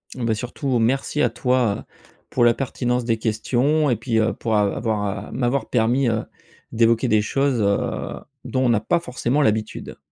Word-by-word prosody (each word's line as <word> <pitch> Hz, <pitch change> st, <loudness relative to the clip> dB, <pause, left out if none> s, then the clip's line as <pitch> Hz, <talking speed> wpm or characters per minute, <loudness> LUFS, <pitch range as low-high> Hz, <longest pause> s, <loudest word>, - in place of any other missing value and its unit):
Beh, 115 Hz, -3 st, -1 dB
surtout 125 Hz, +4 st, -2 dB
merci 135 Hz, +5 st, 0 dB
à 120 Hz, -, +3 dB
toi 120 Hz, -2 st, 0 dB, 0.4 s
pour 120 Hz, -, +1 dB
la 120 Hz, 0 st, +6 dB
pertinence 125 Hz, -2 st, -2 dB
des 115 Hz, -1 st, 0 dB
questions 125 Hz, +7 st, +1 dB
et 125 Hz, -, +2 dB
puis, 115 Hz, +1 st, -1 dB
heu, 110 Hz, 0 st, +1 dB
pour 115 Hz, -2 st, -2 dB
av 105 Hz, -1 st, +2 dB
avoir 105 Hz, -2 st, -2 dB
m'avoir 125 Hz, +2 st, -1 dB
permis, 125 Hz, +3 st, +2 dB
heu, 110 Hz, -1 st, -1 dB, 0.5 s
d'évoquer 115 Hz, +2 st, +3 dB
des 110 Hz, -2 st, +3 dB
choses, 135 Hz, +2 st, 0 dB
heu, 100 Hz, 0 st, -1 dB, 0.3 s
dont 130 Hz, 0 st, 0 dB
on -, -, +3 dB
n'a 115 Hz, -3 st, +3 dB
pas 170 Hz, +11 st, +1 dB
forcément 130 Hz, -1 st, -1 dB
l'habitude. 110 Hz, -5 st, -1 dB
120 Hz, 170 wpm, -22 LUFS, 110-130 Hz, 0.5 s, la